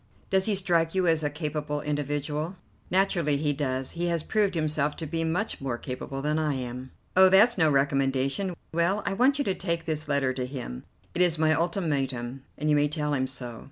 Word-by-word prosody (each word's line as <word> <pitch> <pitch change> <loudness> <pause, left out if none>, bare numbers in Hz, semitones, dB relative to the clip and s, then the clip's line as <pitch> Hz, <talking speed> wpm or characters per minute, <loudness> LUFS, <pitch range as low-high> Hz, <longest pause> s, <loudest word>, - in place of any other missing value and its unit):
"Does 190 -1 +3
he 215 - +2
strike 170 -3 +1
you 185 -1 +2
as 165 -2 +3
a 150 - 0
capable 150 -1 -3
individual?" 150 +3 -2 0.3
"Naturally 175 -6 +2
he 145 0 +1
does. 130 -2 -2
He 175 +1 -2
has 170 -2 0
proved 205 -2 +1
himself 150 -2 0
to 160 - -5
be 165 +2 -2
much 175 +5 -2
more 130 -3 -2
capable 135 +2 -6
than 150 +1 +1
I 150 -3 0
am." 125 0 -5 0.3
"Oh, 190 0 +8
that's 210 +6 +6
no 160 -4 +4
recommendation. 140 +5 +1 0.2
Well, 180 +5 +1
I 200 - 0
want 255 +7 +3
you 285 - 0
to 190 - +1
take 170 -3 -2
this 155 -1 -2
letter 140 -3 +1
to 125 -1 -3
him; 125 - -7 0.3
it 175 - 0
is 175 -2 +4
my 155 0 +3
ultimatum, 140 -8 -1 0.2
and 150 - -2
you 150 - +4
may 145 0 +3
tell 150 -1 -2
him 130 -2 0
so. 125 -3 -7
150 Hz, 205 wpm, -27 LUFS, 140-175 Hz, 0.3 s, Oh